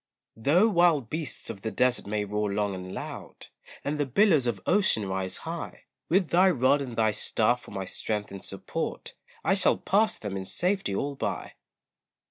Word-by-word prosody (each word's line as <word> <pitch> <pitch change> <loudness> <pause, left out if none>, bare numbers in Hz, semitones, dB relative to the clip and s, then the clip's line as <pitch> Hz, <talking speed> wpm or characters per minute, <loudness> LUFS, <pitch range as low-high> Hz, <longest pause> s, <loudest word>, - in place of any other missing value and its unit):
Though 155 - +4
wild 170 - +3
beasts 155 -7 -3
of 100 -3 -10
the 110 - -2
desert 125 0 +1
may 105 0 -1
roar 105 0 -1
long 100 0 0
and 95 0 -7
loud, - - -8 0.3
And 150 +1 -2
the 145 - +1
billows 155 - +4
of 115 -5 -1
ocean 180 - +2
rise 95 0 -3
high, 165 +1 -6 0.3
With 180 0 +3
thy 185 +2 +5
rod 140 -2 +3
and 125 -4 -5
thy 110 -1 +3
staff 115 +3 +1
for - - -14
my 95 0 -4
strength 105 +2 -3
and 100 -1 -7
support, - - -4 0.3
I - - +3
shall 190 -1 +4
pass 210 +3 +2
them 105 -2 -5
in 95 - -5
safety 180 - 0
all 140 +7 -1
by. 135 - -4
125 Hz, 180 wpm, -27 LUFS, 105-170 Hz, 0.3 s, thy